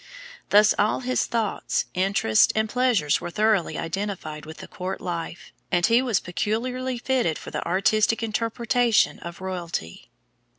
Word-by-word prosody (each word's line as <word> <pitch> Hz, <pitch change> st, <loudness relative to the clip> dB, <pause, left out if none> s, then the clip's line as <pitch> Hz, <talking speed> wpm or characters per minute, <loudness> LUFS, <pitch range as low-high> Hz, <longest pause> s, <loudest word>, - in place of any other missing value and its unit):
Thus 210 Hz, +1 st, +6 dB
all 210 Hz, +4 st, +2 dB
his 255 Hz, 0 st, 0 dB
thoughts, 225 Hz, -4 st, -1 dB
interests, 185 Hz, -, +3 dB
and 220 Hz, 0 st, +1 dB
pleasures 235 Hz, -, +1 dB
were -, -, -4 dB
thoroughly 210 Hz, -1 st, +1 dB
identified 165 Hz, -4 st, -4 dB
with 160 Hz, -, -9 dB
the -, -, -9 dB
court 185 Hz, +1 st, -5 dB
life, 170 Hz, -1 st, -6 dB, 0.2 s
and 175 Hz, -1 st, +3 dB
he 235 Hz, +2 st, +4 dB
was 240 Hz, -7 st, +1 dB
peculiarly 250 Hz, +7 st, -2 dB
fitted 240 Hz, -, 0 dB
for -, -, -9 dB
the -, -, -3 dB
artistic 215 Hz, +5 st, +2 dB
interpretation 230 Hz, +1 st, +1 dB
of 170 Hz, +1 st, -9 dB
royalty. 175 Hz, -, -5 dB
205 Hz, 140 wpm, -24 LUFS, 175-230 Hz, 0.2 s, Thus